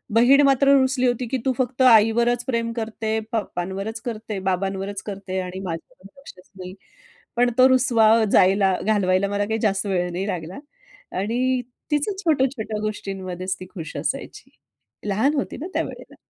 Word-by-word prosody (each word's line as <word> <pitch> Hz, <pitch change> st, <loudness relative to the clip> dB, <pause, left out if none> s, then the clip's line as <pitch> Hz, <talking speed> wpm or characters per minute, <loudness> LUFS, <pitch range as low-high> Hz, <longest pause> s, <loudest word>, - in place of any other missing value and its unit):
बहीण 255 Hz, +5 st, +6 dB
मात्र 275 Hz, 0 st, +4 dB
रुसली 260 Hz, -1 st, +1 dB
होती, 245 Hz, 0 st, -1 dB
की 260 Hz, +3 st, -1 dB
तू 265 Hz, -, +3 dB
फक्त 255 Hz, 0 st, -1 dB
आईवरच 235 Hz, 0 st, +5 dB
प्रेम 230 Hz, -2 st, -1 dB
करते, 220 Hz, -1 st, -2 dB
पप्पांवरच 195 Hz, +1 st, -4 dB
करते, 220 Hz, -3 st, -4 dB
बाबांवरच 195 Hz, +1 st, -2 dB
करते 195 Hz, -2 st, -4 dB
आणि 180 Hz, +1 st, -6 dB
माझ्यावर 170 Hz, +2 st, -8 dB
लक्षच 185 Hz, -10 st, -15 dB
नाही. 185 Hz, 0 st, -8 dB, 0.6 s
पण 245 Hz, 0 st, +4 dB
तो 255 Hz, 0 st, +7 dB
रुसवा 245 Hz, -4 st, +4 dB, 0.2 s
जायला 190 Hz, 0 st, +4 dB
घालवायला 200 Hz, -2 st, +2 dB
मला 205 Hz, 0 st, -1 dB
काही 220 Hz, +2 st, -2 dB
जास्त 200 Hz, -2 st, 0 dB
वेळ 180 Hz, -2 st, 0 dB
नाही 185 Hz, +3 st, -3 dB
लागला. 180 Hz, 0 st, -5 dB, 0.6 s
आणि 250 Hz, +6 st, 0 dB, 0.3 s
तिचं 295 Hz, +7 st, +1 dB
छोट्या-छोट्या 265 Hz, -, 0 dB
गोष्टींमध्येच 190 Hz, -3 st, -4 dB
ती 185 Hz, -, -8 dB
खुश 165 Hz, -6 st, -7 dB
असायची. -, -, -5 dB, 0.6 s
लहान 220 Hz, +9 st, +2 dB
होती 275 Hz, -, -3 dB
ना 320 Hz, -, -5 dB
त्यावेळेला. -, -, -5 dB
215 Hz, 145 wpm, -23 LUFS, 190-245 Hz, 0.6 s, तो